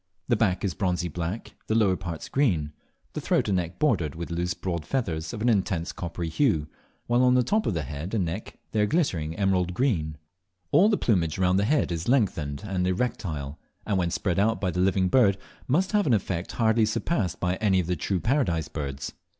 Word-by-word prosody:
The - - +4
back 95 +2 +1
is 95 - -1
bronzy 90 -1 -1
black, 85 +7 -4
the 110 - +1
lower 105 -5 +4
parts 85 -3 -6
green, 85 - +1 0.4
the - - -4
throat - - +1
and 95 - +2
neck 85 0 -3
bordered 90 - +1
with 85 +1 -6
loose 90 +1 -1
broad 85 -4 -3
feathers 80 - -2
of 105 - -5
an - - +2
intense 95 -6 +1
coppery 85 -1 -5
hue, 80 - +1 0.4
while 120 +1 +2
on 125 0 +5
the 125 - +4
top 215 - +1
of 100 - 0
the 80 - -1
head 75 - -5
and 95 -5 +1
neck 85 +6 -5
they 110 - +1
are 105 - +3
glittering 85 - 0
emerald 90 -3 +1
green, 85 - 0 0.5
All 180 +9 +6
the 210 - +2
plumage 85 -9 +1
round 95 0 +3
the 100 - +2
head 145 -6 +2
is 85 0 -3
lengthened 90 - +1
and 90 -3 -1
erectile, 85 - -2 0.3
and 100 -3 +1
when 85 -1 +1
spread 90 +2 -1
out 110 +3 +2
by 95 -2 0
the 90 - -3
living 95 0 +3
bird 100 -3 +4 0.3
must 180 +10 +1
lave 205 -4 +3
an 120 - +5
effect 95 -3 -3
hardly 110 -1 +3
surpassed 105 - -1
by 90 +1 0
any 100 -4 +2
of 90 - 0
the 90 +2 -1
true 90 +4 -1
Paradise 85 - 0
birds. 70 -2 -5
95 Hz, 210 wpm, -26 LUFS, 85-110 Hz, 0.5 s, All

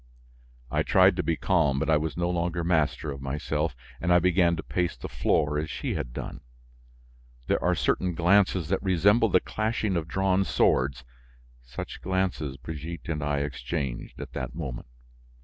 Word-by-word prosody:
I - - +2
tried - - +5
to - - +2
be 85 - 0
calm 80 -7 +2
but - - -1
I 80 - +4
was 80 +1 -3
no 85 0 +1
longer 85 -1 -1
master 75 -4 +1
of 70 -1 -7
myself, 75 +2 -2 0.3
and 85 - +1
I 90 - +7
began 90 -1 +3
to 80 - -5
pace 90 -1 -1
the - - -6
floor 75 -1 +1
as 75 0 -3
she - - -3
had - - -4
done. - - -6 1.0
There - - 0
are - - +3
certain 90 -2 0
glances 90 -1 +3
that 95 - +1
resemble 100 +5 +3
the 90 - +5
clashing 110 -2 -1
of 80 -2 -1
drawn 95 +2 +2
swords; 65 -7 +1 0.6
such 60 +1 -8
glances, 90 -7 -1
Brigitte 80 +5 -7
and 75 -2 -2
I 70 -1 0
exchanged 70 -1 -4
at - - -8
that 65 -1 -5
moment. 65 -8 -5
80 Hz, 170 wpm, -27 LUFS, 70-90 Hz, 1.0 s, I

